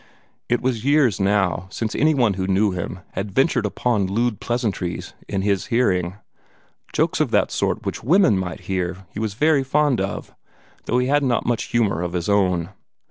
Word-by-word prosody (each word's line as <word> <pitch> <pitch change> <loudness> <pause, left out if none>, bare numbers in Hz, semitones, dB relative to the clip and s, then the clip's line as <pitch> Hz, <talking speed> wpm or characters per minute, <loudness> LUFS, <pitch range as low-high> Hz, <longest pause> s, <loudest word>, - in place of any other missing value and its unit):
It 120 - +1
was 125 -3 -1
years 140 - +3
now 95 -3 +1
since 110 +3 -3
any 155 +1 +3
one 120 -6 +3
who 95 0 -3
knew 100 +2 +2
him 90 0 -5
had 100 +2 -4
ventured 135 -5 +2
upon 105 -2 0
lewd 115 +3 0
pleasantries 105 -7 -2
in 95 -1 -2
his 100 -2 0
hearing. 90 -7 +1 0.8
Jokes - - 0
of - - +2
the - - +3
sort - - -1
which - - -4
women 170 - +4
might 90 -3 -3
hear 95 0 -3
he 105 - -6
was 110 -2 -2
very 150 +2 +3
fond 140 -4 +2
of 95 +1 -4 0.5
though 125 - +1
he 125 - +2
had 145 +3 +2
not 125 -4 0
much 120 -2 0
humor 105 -8 0
of 90 -1 -3
his 85 -2 -2
own. 90 -4 +2
105 Hz, 185 wpm, -22 LUFS, 95-125 Hz, 0.8 s, women